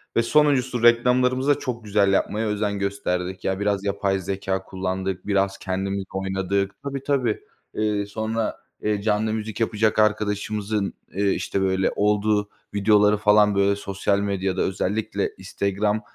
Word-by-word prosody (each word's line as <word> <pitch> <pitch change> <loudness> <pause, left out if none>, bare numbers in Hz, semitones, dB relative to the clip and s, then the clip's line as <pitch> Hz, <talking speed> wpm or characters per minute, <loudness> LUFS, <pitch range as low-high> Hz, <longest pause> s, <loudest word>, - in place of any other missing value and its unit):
ve 115 - +3
sonuncusu 130 -4 +2
reklamlarımıza 125 +3 +4
çok 120 -4 -4
güzel 100 -1 +2
yapmaya 110 +3 0
özen 105 -1 -1
gösterdik. 95 -2 -2
Ya, 95 0 -1
biraz 100 -1 0
yapay 100 -1 0
zekâ 95 0 -3
kullandık, 95 0 -4
biraz 100 -1 +1
kendimiz 95 +1 -2
oynadık. 95 +1 -1
Tabii, 140 -1 -4
tabii, 130 -6 0 0.3
eee, 105 -1 0
sonra, 110 +2 -3 0.2
eee, 105 -1 0
canlı 110 +1 +1
müzik 110 +1 -4
yapacak 110 -1 +1
arkadaşımızın, 105 -1 0 0.2
eee, 100 0 +1
işte, 95 - -1
böyle, 95 0 +1
olduğu 105 0 +1 0.2
videoları, 105 0 +4
falan, 105 0 +4
böyle, 100 0 +3
sosyal 100 0 -1
medyada, 95 -2 -1
özellikle 100 +3 -1
Instagram 105 +2 -1
105 Hz, 135 wpm, -23 LUFS, 95-110 Hz, 0.3 s, reklamlarımıza